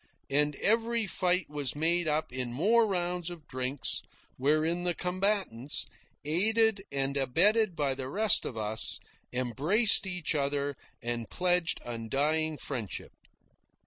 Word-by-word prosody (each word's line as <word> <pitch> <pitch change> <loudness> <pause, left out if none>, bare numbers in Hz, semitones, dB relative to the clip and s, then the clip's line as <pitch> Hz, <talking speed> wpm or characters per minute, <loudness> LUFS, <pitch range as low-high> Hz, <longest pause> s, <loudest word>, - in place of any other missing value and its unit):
And 145 +1 +2
every 230 +3 +1
fight 180 -1 0
was 145 -2 -3
made 170 +2 +1
up 155 -2 -1
in 125 -2 -3
more 215 - +3
rounds 180 -2 -2
of 170 -4 -10
drinks, 130 0 -3 0.3
wherein 155 +6 +1
the 175 -1 +1
combatants, 180 - -1 0.4
aided 215 +6 +2
and 140 0 -1
abetted 180 - +3
by 140 -3 0
the 130 -1 -6
rest 210 +5 +3
of 115 - -6
us, 110 0 -2 0.3
embraced 150 - +4
each 180 -3 -1
other 140 -1 -1 0.3
and 120 -1 -3
pledged 180 -1 +1
undying 145 +7 0
friendship. 120 -10 -5
155 Hz, 125 wpm, -29 LUFS, 135-185 Hz, 0.4 s, embraced